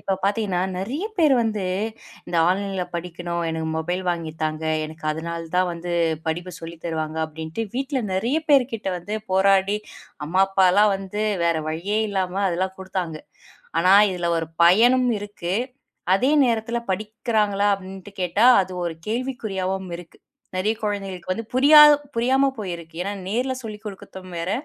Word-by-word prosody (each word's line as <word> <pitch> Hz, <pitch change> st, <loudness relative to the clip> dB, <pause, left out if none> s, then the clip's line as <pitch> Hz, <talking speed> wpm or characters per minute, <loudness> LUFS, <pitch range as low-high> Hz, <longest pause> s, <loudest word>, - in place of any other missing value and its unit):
இப்போ 195 Hz, -, -1 dB
பார்த்தீங்கன்னா 200 Hz, -3 st, 0 dB, 0.2 s
நிறைய 265 Hz, -, -3 dB
பேர் 305 Hz, -5 st, +5 dB
வந்து 215 Hz, -4 st, -1 dB, 0.6 s
இந்த 170 Hz, -, -2 dB
ஆன்லைன்ல 195 Hz, 0 st, -1 dB
படிக்கணும். 170 Hz, 0 st, -4 dB
எனக்கு 160 Hz, 0 st, -3 dB
மொபைல் 175 Hz, +3 st, -2 dB
வாங்கி 165 Hz, -2 st, -3 dB
தாங்க. 155 Hz, 0 st, -2 dB, 0.2 s
எனக்கு 155 Hz, 0 st, -10 dB
அதனாலதான் 170 Hz, +2 st, -2 dB
வந்து 175 Hz, +1 st, -5 dB, 0.3 s
படிப்பு 175 Hz, +3 st, -3 dB
சொல்லித் 165 Hz, 0 st, -9 dB
தருவாங்க 160 Hz, -1 st, -3 dB
அப்படின்ட்டு 160 Hz, +7 st, -5 dB
வீட்டுல 270 Hz, 0 st, -1 dB
நிறைய 235 Hz, +11 st, +1 dB
பேர்கிட்ட 245 Hz, -7 st, +2 dB
வந்து 205 Hz, +5 st, -4 dB, 0.2 s
போராடி 195 Hz, +1 st, +3 dB, 0.5 s
அம்மா, 185 Hz, +4 st, +3 dB
அப்பாலாம் 195 Hz, +2 st, +4 dB
வந்து 195 Hz, +2 st, -4 dB, 0.2 s
வேற 170 Hz, -1 st, +2 dB
வழியே 185 Hz, +7 st, -1 dB
இல்லாம 190 Hz, 0 st, -1 dB
அதெல்லாம் 185 Hz, +2 st, -2 dB
கொடுத்தாங்க. 185 Hz, -4 st, -4 dB, 0.6 s
ஆனா 185 Hz, +3 st, +5 dB, 0.2 s
இதுல 175 Hz, -2 st, -2 dB
ஒரு 165 Hz, -1 st, -4 dB, 0.2 s
பயனும் 245 Hz, +8 st, +5 dB
இருக்கு. 200 Hz, -3 st, -4 dB, 0.6 s
அதே 255 Hz, +8 st, +2 dB
நேரத்துல 230 Hz, 0 st, 0 dB
படிக்கறாங்களா? 210 Hz, 0 st, 0 dB
அப்படின்னு 195 Hz, +1 st, -11 dB
கேட்டா 190 Hz, +6 st, +3 dB, 0.2 s
அது 185 Hz, -, -8 dB
ஒரு 170 Hz, -, -3 dB
கேள்விக்குறியாகவும் 195 Hz, -6 st, -3 dB
இருக்கு. 175 Hz, -2 st, -14 dB, 0.4 s
நிறைய 210 Hz, +4 st, +1 dB
குழந்தைகளுக்கு 195 Hz, -4 st, -4 dB
வந்து 225 Hz, +5 st, -4 dB
புரியா 285 Hz, +4 st, +7 dB, 0.4 s
புரியாம 265 Hz, +4 st, +3 dB
போயிருக்கு. 170 Hz, -5 st, -6 dB
ஏன்னா 200 Hz, +2 st, -3 dB, 0.2 s
நேர்ல 250 Hz, +5 st, 0 dB
சொல்லிக்கொடுக்கவும் 205 Hz, -4 st, -9 dB
வேற 170 Hz, +3 st, -2 dB
190 Hz, 135 wpm, -23 LUFS, 175-215 Hz, 0.6 s, புரியா